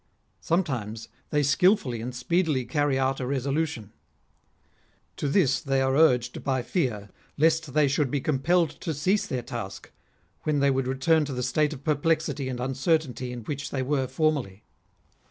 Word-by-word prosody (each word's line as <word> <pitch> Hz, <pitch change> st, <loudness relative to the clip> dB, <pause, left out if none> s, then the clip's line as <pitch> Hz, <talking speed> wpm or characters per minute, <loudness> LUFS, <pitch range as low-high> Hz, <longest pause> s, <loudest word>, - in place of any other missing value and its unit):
Sometimes 120 Hz, -, -2 dB, 0.2 s
they 150 Hz, -1 st, +1 dB
skilfully 140 Hz, -, +2 dB
and 125 Hz, +2 st, -5 dB
speedily 150 Hz, 0 st, 0 dB
carry 145 Hz, -2 st, +1 dB
out 135 Hz, 0 st, 0 dB
a 125 Hz, -, -3 dB
resolution. 140 Hz, -3 st, -2 dB, 1.2 s
To 145 Hz, -, -1 dB
this 135 Hz, -5 st, +2 dB
they 135 Hz, -1 st, 0 dB
are 135 Hz, 0 st, +1 dB
urged 125 Hz, -6 st, +3 dB
by 130 Hz, -2 st, 0 dB
fear 110 Hz, -, -2 dB, 0.3 s
lest 160 Hz, -2 st, +2 dB
they 150 Hz, -2 st, +4 dB
should 140 Hz, 0 st, +1 dB
be 145 Hz, -, 0 dB
compelled 160 Hz, +4 st, +1 dB
to 160 Hz, -, -3 dB
cease 185 Hz, +9 st, +1 dB
their 125 Hz, -2 st, -3 dB
task, 115 Hz, -5 st, -7 dB, 0.5 s
when 150 Hz, -2 st, 0 dB
they 140 Hz, 0 st, +3 dB
would 135 Hz, -1 st, 0 dB
return 145 Hz, +5 st, +2 dB
to 140 Hz, -, -5 dB
the 125 Hz, 0 st, -3 dB
state 150 Hz, +5 st, +1 dB
of 140 Hz, -3 st, -8 dB
perplexity 150 Hz, -2 st, 0 dB
and 125 Hz, -1 st, -4 dB
uncertainty 130 Hz, -1 st, -1 dB
in 125 Hz, -1 st, -6 dB
which 140 Hz, +4 st, -5 dB
they 130 Hz, -2 st, -2 dB
were 135 Hz, -1 st, 0 dB
formerly. 135 Hz, -8 st, -1 dB
135 Hz, 160 wpm, -26 LUFS, 125-155 Hz, 1.2 s, they